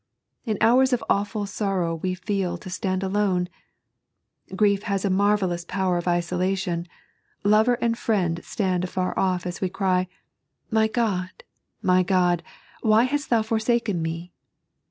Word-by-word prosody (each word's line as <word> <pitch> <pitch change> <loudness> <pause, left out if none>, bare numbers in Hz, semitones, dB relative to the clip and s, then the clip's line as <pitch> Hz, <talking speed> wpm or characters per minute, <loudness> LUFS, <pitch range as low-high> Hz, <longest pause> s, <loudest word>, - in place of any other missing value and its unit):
In 215 -3 -1
hours 255 +3 +5
of 240 - 0
awful 205 +1 0
sorrow 195 -4 -1
we 185 +3 -2
feel 185 -1 -2
to 185 - -10
stand 185 +1 -2
alone. 190 -2 +1 1.1
Grief 200 -1 +3
has 195 0 0
a 195 - +1
mar 205 +2 +3
vellous 175 -3 -2
power 190 -1 0
of 175 - -6
isolation 175 0 0 0.3
— - - -38
^lover 220 +4 +4
and 235 -1 +1
friend 185 -8 0
stand 185 -5 -1
afar 185 0 -2
off 185 -2 +1
Bs 175 0 -5
we 190 - 0
cry: 185 -1 0 0.6
"My 220 0 +3
God, 205 -6 -2 0.4
my 185 0 +4
God, 180 -2 +2 0.4
why 220 +1 +4
hast 290 +3 -1
thou 230 -2 +3
forsaken 220 -4 0
me?" 165 +2 -4
190 Hz, 150 wpm, -24 LUFS, 180-215 Hz, 1.1 s, hours